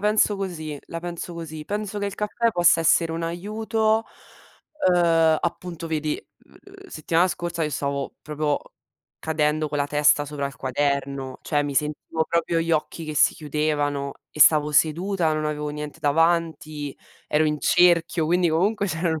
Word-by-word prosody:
penso 210 0 +2
così. 160 -6 -5
La 165 - -6
penso 175 0 -6
così. 160 -2 -7
Penso 210 0 -3
che 200 - -2
il 200 - -5
caffè 220 +2 0
possa 175 -4 +4
essere 165 0 +3
un 165 0 -3
aiuto, 215 +5 0 0.9
ehm, 165 -2 +4
appunto 170 -1 -4
vedi, 155 -1 -2 0.3
mhmm, 395 0 -16
settimana 165 - +1
scorsa 170 -1 -3
io 155 - 0
stavo 140 -1 -3
proprio 150 -1 -1 0.6
cadendo 155 -1 0
con 145 - -3
la 145 -1 0
testa 145 0 +3
sopra 145 -1 -3
il 140 -2 -9
quaderno; 140 0 -2
cioè, 145 -1 0
mi 145 -1 -4
sentivo 150 +3 -1
proprio 170 0 0
gli 165 0 -1
occhi 160 +1 -1
che 155 - -5
si 150 - +4
chiudevano 145 -2 -1 0.2
e 150 - -9
stavo 150 0 +6
seduta, 165 +3 +2
non 155 - -2
avevo 150 0 -2
niente 150 0 -6
davanti, 155 -2 0 0.3
ero 150 +1 +2
in 150 -1 -1
cerchio, 170 -2 +3
quindi 175 +1 +2
comunque 200 +6 +1
c'erano 160 -2 -1
160 Hz, 160 wpm, -24 LUFS, 150-175 Hz, 0.9 s, stavo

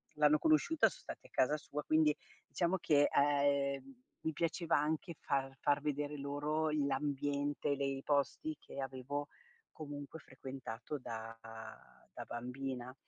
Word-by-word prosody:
l'hanno 150 0 +6
conosciuta, 320 0 +5
son - - -12
stati - - -8
a - - -26
casa 145 +4 +3
sua, 150 -1 -5
quindi 155 0 +4 0.3
diciamo 175 +2 +1
che, 145 -4 +4
ehm, 140 - +2 0.2
mi 160 - -1
piaceva 165 +1 +1
anche 155 +3 0
far 135 -1 0
far 145 0 +3
vedere 145 0 -1
loro 145 +3 0
l'ambiente, 145 0 0
le 140 0 -1
i 135 0 -2
posti 150 - +1
che 140 - -7
avevo 135 +2 -3 0.4
comunque 145 0 -7
frequentato 130 -1 -6
da 115 -1 -6 0.8
da - - -5
bambina, 125 +1 -4
145 Hz, 135 wpm, -36 LUFS, 135-155 Hz, 0.8 s, l'hanno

